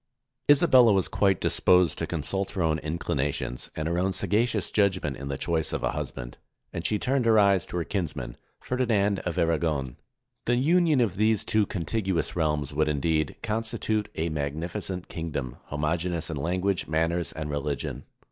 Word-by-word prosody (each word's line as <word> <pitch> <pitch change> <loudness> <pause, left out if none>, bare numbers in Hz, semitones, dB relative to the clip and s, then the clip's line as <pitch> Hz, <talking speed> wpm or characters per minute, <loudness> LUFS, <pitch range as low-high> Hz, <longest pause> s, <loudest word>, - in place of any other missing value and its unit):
] - - -42
Isabella 135 -6 +6
was 95 -2 +2
quite 95 -3 +2
disposed 90 -2 +4
to - - -2
consult 95 +5 -2
her 95 - -1
own 80 -1 +1
inclina 75 -3 -1
tions, 60 - -4
and 80 0 -2
her 85 +1 0
own 95 +1 0
sagacious 105 +2 +1
judgment 95 -8 +1
in 70 +3 -7
the 70 -1 -3
choice 80 -2 -1
of - - -2
a - - +1
husband, - - -6 0.3
and 85 - -4
she 105 - +1
turned 130 +2 0
her 110 -1 +5
eyes 100 -3 +4
to - - -5
her 85 - 0
kinsman, 75 -11 -3 0.2
Fer 125 - -3
dinand 105 -6 +2
of 90 - -3
Aragon. 80 -6 0 0.5
The 120 - +2
union 160 0 +3
of 100 -5 0
these 110 0 +2
two 110 -2 +2
contiguous 95 0 -2
realms 75 -4 0
would, 75 +1 +1
indeed, 75 +1 0
constitute 110 -1 -1
a 80 +1 -1
magnificent 85 +6 -4
king 80 0 -5
dom, 65 -5 -4
homogeneous 80 +3 -2
in 80 - -4
language, 90 +5 -1
manners, 80 +1 0
and 75 -1 -5
religion. 75 0 -3
85 Hz, 175 wpm, -27 LUFS, 75-105 Hz, 0.5 s, Isabella